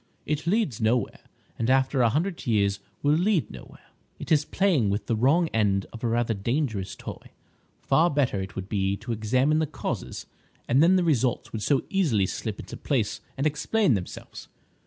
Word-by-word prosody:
"It 150 +2 -2
leads 175 - +1
nowhere, 115 +3 +1 0.4
and 115 - 0
after 130 0 +3
a 120 - +4
hundred 165 - -2
years 100 -3 +2 0.2
will 145 +1 +4
lead 180 +1 +1
nowhere. - - -13 0.3
It - - -8
is 150 -2 +4
playing 170 - +2
with 100 +1 -2
the 115 - 0
wrong 145 +10 +3
end 100 -3 +1
of 115 - -10
a - - +1
rather 115 0 +1
dangerous 110 -2 -2
toy. - - -9 0.5
Far 170 +2 +3
better, 135 - 0
it 95 +1 -7
would 95 0 -5
be, 100 -1 0
to 110 +4 -6
examine 130 +8 +1
the 160 - 0
causes, 155 - -5 0.4
and 130 +4 +4
then 175 +3 +6
the 185 - +3
results 130 -7 0
would 110 - -3
so 135 +6 +2
easily 145 - +2
slip 105 +2 -4
into - - -8
place 110 -7 -1 0.2
and 135 - -1
explain 155 - +2
themselves. 95 -4 -6
125 Hz, 180 wpm, -26 LUFS, 105-155 Hz, 0.5 s, then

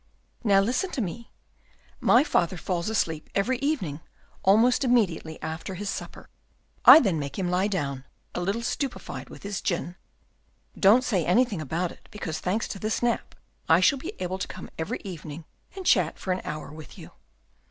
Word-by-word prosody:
"Now 200 -3 +5
listen 250 - 0
to 255 - -1
me. 225 +4 -5 0.7
My 245 - +5
father 175 - +1
falls 170 +3 -2
asleep 165 -8 -1
every 240 +6 +1
evening 265 - -1 0.4
almost 225 +7 +4
immediately 195 -11 +1
after 160 +4 -5
his 200 +2 -3
supper; - - -7 0.6
I - - +11
then 190 - +1
make 140 -1 -5
him 180 -2 -1
lie 185 +2 +2
down, 140 -9 -3 0.3
a - - -3
little 200 +6 -1
stupefied 270 +2 -4
with - - -12
his 200 -1 -4
gin. 175 0 -2 0.8
Don't 215 +6 +5
say 195 -9 +1
anything 205 +1 +2
about 165 +4 -2
it, - - -16
because, 165 -7 -5
thanks 200 +5 -1
to 195 - -6
this 215 +3 -2
nap, 240 -1 -1 0.3
I 160 - +7
shall 265 +9 +4
be 340 +9 -6
able 185 +1 -3
to - - -3
come - - -9
every 160 - -4
evening 160 -4 -8 0.3
and 380 -1 -7
chat 180 - +3
for 190 - -3
an 180 - -4
hour 150 -1 -6
with 155 0 -11
you." - - -11
190 Hz, 175 wpm, -26 LUFS, 165-230 Hz, 0.8 s, I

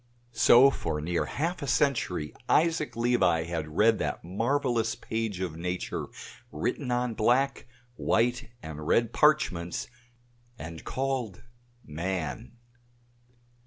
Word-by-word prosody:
So 130 +3 +7
for 80 - -3
near 85 +3 -1
half 170 +4 -2
a 140 - -4
century 115 - 0 0.2
Isaac 160 -1 +2
Levi 115 -9 +2
had 80 -2 -5
read 110 +1 +4
that - - -3
marvelous 115 +4 0
page 110 -6 -3
of 90 -4 -3
nature 90 +2 -3 0.4
written - - -2
on 125 -1 0
black, 125 +6 +1 0.3
white 120 +1 +1
and 75 -1 -7
red 115 +4 +2
parchments, 150 - +2 0.7
and 80 -2 -8
called 130 -7 -3 0.4
"Man." 90 +7 -4
115 Hz, 110 wpm, -28 LUFS, 85-130 Hz, 0.7 s, So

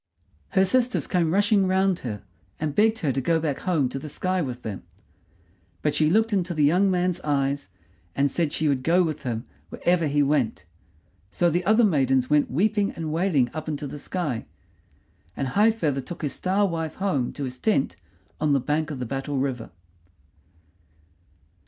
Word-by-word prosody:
Her 190 - +6
sisters 250 +4 +2
came 170 -4 +1
rushing 200 +1 +3
round 190 -1 +2
her, 105 -5 -6 0.4
and 150 -2 -2
begged 220 +4 +3
her 140 - +2
to 135 - -1
go 165 +5 +2
back 150 -4 -2
home 160 -8 +1
to 135 - -5
the 150 - -7
sky 185 +5 -1
with 125 -5 -5
them; 105 -4 -5 1.0
but 150 - +1
she 155 -1 +2
looked 220 +5 +2
into 180 -3 0
the 150 - +2
young 180 +7 +4
man's 180 -1 0
eyes, 140 -3 -1 0.5
and 140 - +2
said 165 -1 0
she 155 - -1
would 135 -3 +1
go 175 +6 +3
with 155 -3 -3
him 120 -2 -3 0.2
wherever 175 -2 +1
he 145 0 +2
went. 140 -5 0 0.6
So 175 - +1
the 175 +3 0
other 220 +3 +4
maidens 135 - +2
went 150 -1 +3
weeping 205 - +1
and 160 -2 -4
wailing 160 -8 +1
up 155 0 -6
into 150 -1 -3
the 145 +1 -7
sky, 145 -9 -3 0.9
and 135 - -2
High 210 - +4
feather 155 -12 -1
took 170 +5 -9
his 145 - -1
Star 195 +2 +1
wife 165 -3 -3
home 185 -11 -1
to 145 - -5
his 130 -1 -5
tent 205 -11 +1 0.4
on 150 -1 +2
the 140 - +3
bank 150 +4 -1
of 150 - -5
the 125 - -4
Battle 135 +3 -3
River. 130 -4 -2
155 Hz, 185 wpm, -25 LUFS, 140-185 Hz, 1.0 s, Her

